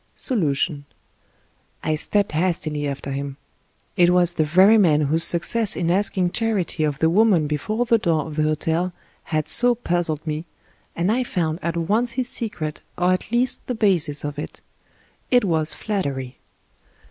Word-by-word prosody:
SOLUTION 150 - 0 1.0
I 155 - 0
STEPPED 200 +6 0
hastily 155 -3 -2
after 140 0 -5
him; 140 0 -5 0.6
it 175 -3 +4
was 180 -1 +3
the 155 - +1
very 185 +8 +5
man 155 -6 +3
whose 155 +3 +6
success 205 +5 +4
in 170 -1 -1
asking 185 -1 0
charity 205 -8 -1
of 150 -2 -1
the 160 - +2
woman 185 -2 +3
before 210 +11 -2
the 230 -1 +2
door 160 -6 0
of 155 -2 -8
the 155 - 0
hotel 160 +4 -1 0.3
had 155 -2 -2
so 245 +6 +4
puzzled 175 -8 -2
me, 155 +1 -4 0.5
and 175 +4 0
I 250 +3 +1
found 165 -8 -2
at 170 0 -3
once 215 +8 0
his 250 0 -2
secret, 190 -10 -4 0.2
or 180 +1 +2
at 185 - -4
least 245 +1 0
the 250 - -2
basis 175 -9 +1
of 145 0 -5
it: - - -8 0.7
it 245 -3 +3
was 160 -3 -1
flattery. 140 - -4
170 Hz, 160 wpm, -22 LUFS, 155-205 Hz, 1.0 s, whose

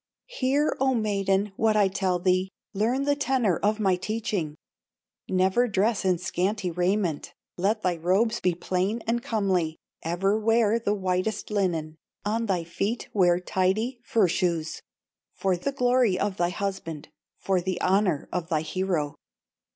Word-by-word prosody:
"Hear, 290 - 0
O 265 -1 +2
maiden, 200 -2 +1
what 220 -1 +3
I 205 -2 +5
tell 190 -2 0
thee, 185 +1 +1 0.2
Learn 230 +7 +1
the 285 0 +2
tenor 255 - +1
of 210 +1 0
my 190 -3 +3
teaching: 200 -5 -3 0.7
Never 190 +6 +3
dress 210 +1 +1
in 185 -2 +2
scanty 185 +2 -1
raiment, 180 -2 -1 0.2
Let 210 +4 0
thy 180 -2 +1
robes 195 +8 +1
be 180 -2 +1
plain 190 +6 -1
and 235 +1 0
comely, 190 -9 0 0.2
Ever 195 +6 0
wear 225 0 +3
the 210 -2 0
whitest 185 +3 -1
linen, 165 -6 -1 0.3
On 225 +2 0
thy 180 -4 0
feet 200 +7 -3
wear 175 -3 +4
tidy 195 +7 0
fur 220 -5 +3
shoes, 170 -2 -1 0.5
For 190 -1 +1
the 180 +11 -2
glory 250 -6 +2
of 200 -1 -1
thy 175 0 +1
husband, 180 -5 -4 0.3
For 190 -2 0
the 185 0 -2
honor 185 -5 +1
of 180 -2 -3
thy 155 -3 +1
hero. 160 -2 -1
195 Hz, 150 wpm, -26 LUFS, 180-220 Hz, 0.7 s, I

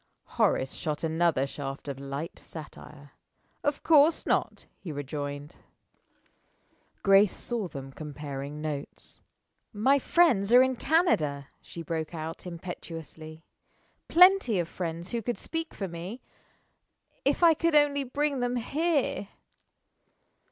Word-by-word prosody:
Horace 130 - +1
shot 150 0 -4
another 160 -3 +2
shaft 140 0 -7
of 140 -1 -5
light 140 +4 -6
satire. 150 -2 -11 0.5
"Of 290 -1 -1
course 310 0 +5
not!" - - 0
he 175 - -7
rejoined. 145 0 -5 1.5
Grace 195 0 +5
saw 235 -5 -3
them 135 -4 -8
comparing 145 0 -7
notes. 150 -2 -6 0.5
"My 260 +7 +3
friends 250 - +3
are 250 +1 +9
in 260 0 0
Canada," 155 - +1
she 170 - -9
broke 160 0 -4
out, 160 +3 -6
impetuously. 165 -2 -8 0.6
"Plenty 360 - +6
of 170 -2 0
friends 170 0 -5
who 235 - -1
could 240 +2 -3
speak 325 0 -4
for 195 - -5
me, 180 +8 -7 1.0
if 280 +5 +1
I 335 -1 +8
could 330 0 +1
only 290 -1 +4
bring 280 +1 -1
them 245 0 -1
here." 285 - 0
175 Hz, 120 wpm, -28 LUFS, -, 1.5 s, are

